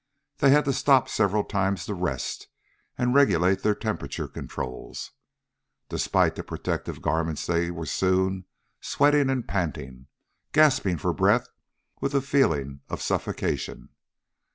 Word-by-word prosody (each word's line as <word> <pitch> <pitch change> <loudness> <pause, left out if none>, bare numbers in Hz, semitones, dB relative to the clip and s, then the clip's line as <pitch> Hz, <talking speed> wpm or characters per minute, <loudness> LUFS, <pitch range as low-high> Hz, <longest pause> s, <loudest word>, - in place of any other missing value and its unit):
They 140 - +5
had 150 +2 +5
to 135 - +1
stop 135 -1 +4
several 105 -1 +1
times 95 -3 -1
to 105 - -3
rest 90 -9 -3 0.5
and 125 0 +1
regulate 95 - +4
their 105 -1 +2
temperature 110 0 -4
controls. 65 -1 -7 0.8
Despite - - +1
the - - -6
protective - - -4
garments 80 -1 -1
they 85 0 0
were 85 -2 -5
soon 95 +3 0 0.3
sweating 145 -1 +3
and 130 -3 -1
panting, 70 -8 -4 0.5
gasping 135 - +4
for - - -1
breath - - +2 0.5
with 140 - -2
the 140 - +3
feeling 75 - +1
of - - -4
suffocation. - - -2
95 Hz, 130 wpm, -26 LUFS, 85-135 Hz, 0.8 s, They